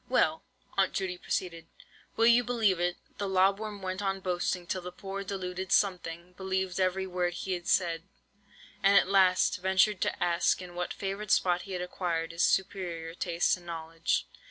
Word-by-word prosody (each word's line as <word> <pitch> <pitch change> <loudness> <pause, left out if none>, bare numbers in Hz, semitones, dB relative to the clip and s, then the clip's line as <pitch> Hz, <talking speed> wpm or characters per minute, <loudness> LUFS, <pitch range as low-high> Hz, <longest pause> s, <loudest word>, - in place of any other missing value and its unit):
"Well," 160 -11 +2 0.4
Aunt 190 - +3
Judy 185 -2 -2
proceeded, 165 -3 -3 0.5
"will 225 - +4
you 235 +1 +6
believe 225 -7 +2
it, 175 0 0 0.2
the 200 -1 -1
lob 190 +1 +3
worm 210 -2 -6
went 185 +1 -3
on 195 -1 -1
boasting 180 -1 -1
till 185 +1 -2
the 180 0 -7
poor 195 +2 -6
deluded 190 -1 -4
'something' 180 -3 0
believed 190 0 -2
every 190 0 +1
word 180 -1 -1
he 185 -1 -3
said, 170 -2 +1 0.8
and 200 +1 +6
at - - +5
last 185 -2 +4
ventured 190 +1 +3
to - - 0
ask 175 0 +2
in 180 -1 -9
what 175 0 -3
favoured 200 +1 -4
spot 180 -1 +3
he - - -4
had 180 -1 -2
acquired 170 -2 -2
his 165 0 -3
superior 175 -5 0
tastes 170 0 +1
and 175 -1 -16
knowledge. 165 0 -2
185 Hz, 175 wpm, -30 LUFS, 175-195 Hz, 0.8 s, you